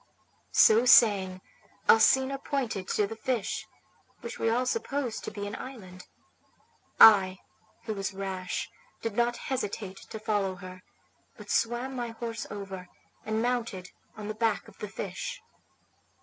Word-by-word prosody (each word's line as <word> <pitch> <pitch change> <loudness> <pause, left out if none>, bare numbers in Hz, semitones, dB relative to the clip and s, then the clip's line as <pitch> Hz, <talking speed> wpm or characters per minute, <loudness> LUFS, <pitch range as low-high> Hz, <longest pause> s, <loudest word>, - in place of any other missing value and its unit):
So 220 +2 +7
saying, 195 -6 +5 0.5
Alcina 265 +5 +5
pointed 240 -10 -3
to 210 - +1
the 225 - -6
fish, 230 -1 -2 0.5
which 235 - -7
we 225 - +1
all 245 +3 +1
supposed 275 - -2
to - - -3
be 205 -1 -6
an 205 +2 -5
island. 185 -9 -10 0.9
I, 190 -4 +8 0.5
who 220 - -3
was 195 -1 -3
rash, 190 -2 -4 0.4
did 225 -3 -3
not 240 +1 +1
hesitate 205 -7 -4
to - - -9
follow 205 -3 -1
her; 185 0 -10 0.6
but - - -8
swam 240 +3 0
my 240 -1 -3
horse 230 -1 -5
over, 195 -3 -7 0.4
and 220 +1 -1
mounted 230 -7 -2 0.3
on 210 -1 -6
the 215 - -3
back 220 -1 0
of - - -17
the - - -4
fish. - - -5
220 Hz, 140 wpm, -28 LUFS, 195-240 Hz, 0.9 s, I